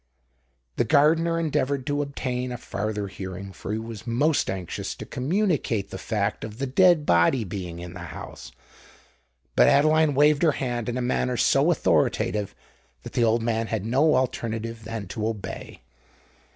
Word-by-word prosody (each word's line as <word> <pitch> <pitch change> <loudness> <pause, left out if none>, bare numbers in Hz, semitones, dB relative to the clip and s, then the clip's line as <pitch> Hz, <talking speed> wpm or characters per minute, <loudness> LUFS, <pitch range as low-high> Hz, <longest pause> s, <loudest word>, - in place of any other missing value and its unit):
The - - +3
gardener 160 +5 +3
endeavoured 140 -4 0
to 145 -1 0
obtain 125 -3 -3
a 125 - -4
farther 105 -2 -3
hearing—for 95 +1 -7
he 110 - -1
was 110 0 -7
most 145 +5 +1
anxious 95 -3 -4
to - - -8
communicate 140 - -1
the 95 - -6
fact 105 0 -2
of 110 0 -7
the 135 - -2
dead 160 +3 +4
body 85 +7 +3
being 90 -3 -6
in 85 0 -8
the - - -9
house; - - -9 1.0
but - - +6
Adeline 155 0 +4
waved 150 +1 +4
her 160 -3 +4
hand 120 -4 -3
in 120 - -2
a 125 - -1
manner 125 0 0
so - - +3
authoritative, 105 -1 +1 0.5
that - - -9
the - - +1
poor 115 - +4
old 115 +1 +1
man 115 -1 0
had 110 -3 -3
no 140 +7 +3
alternative 115 -3 -2
than 110 -3 -5
to 110 +2 -2
obey. 110 -3 -6
120 Hz, 165 wpm, -25 LUFS, 105-140 Hz, 1.0 s, but